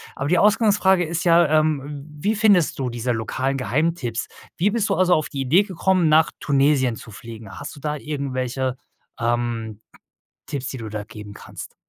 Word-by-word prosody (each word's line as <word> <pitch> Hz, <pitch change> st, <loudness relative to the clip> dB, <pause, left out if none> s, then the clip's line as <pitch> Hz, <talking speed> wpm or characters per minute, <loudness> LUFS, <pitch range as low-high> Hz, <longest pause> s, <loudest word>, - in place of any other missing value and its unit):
Aber 135 Hz, -, -3 dB
die 180 Hz, -, +3 dB
Ausgangsfrage 205 Hz, -4 st, +4 dB
ist 165 Hz, +1 st, -3 dB
ja, 170 Hz, -1 st, +5 dB
ähm, 145 Hz, -2 st, -2 dB
wie 205 Hz, +9 st, 0 dB
findest 200 Hz, -9 st, +3 dB
du 130 Hz, -2 st, -1 dB
diese 120 Hz, +1 st, -2 dB
lokalen 130 Hz, +4 st, -2 dB
Geheimtipps? 135 Hz, -3 st, -1 dB, 0.3 s
Wie 190 Hz, +5 st, +2 dB
bist 220 Hz, -1 st, 0 dB
du 195 Hz, -, +2 dB
also 185 Hz, -1 st, +3 dB
auf 155 Hz, -, +1 dB
die 140 Hz, -, -4 dB
Idee 155 Hz, +10 st, +4 dB
gekommen, 185 Hz, -2 st, +1 dB
nach 155 Hz, +1 st, +4 dB
Tunesien 135 Hz, -3 st, +2 dB
zu 110 Hz, -, -11 dB
fliegen? 110 Hz, -1 st, -10 dB
Hast -, -, -7 dB
du -, -, -12 dB
da 150 Hz, 0 st, -2 dB
irgendwelche, 130 Hz, -3 st, -3 dB, 0.4 s
ähm, 115 Hz, -2 st, -2 dB, 0.7 s
Tipps, 135 Hz, -3 st, -4 dB
die 130 Hz, -, -6 dB
du 110 Hz, -3 st, -6 dB
da 105 Hz, 0 st, -5 dB
geben 105 Hz, -2 st, -10 dB
kannst? -, -, -10 dB
140 Hz, 175 wpm, -22 LUFS, 120-170 Hz, 0.7 s, ja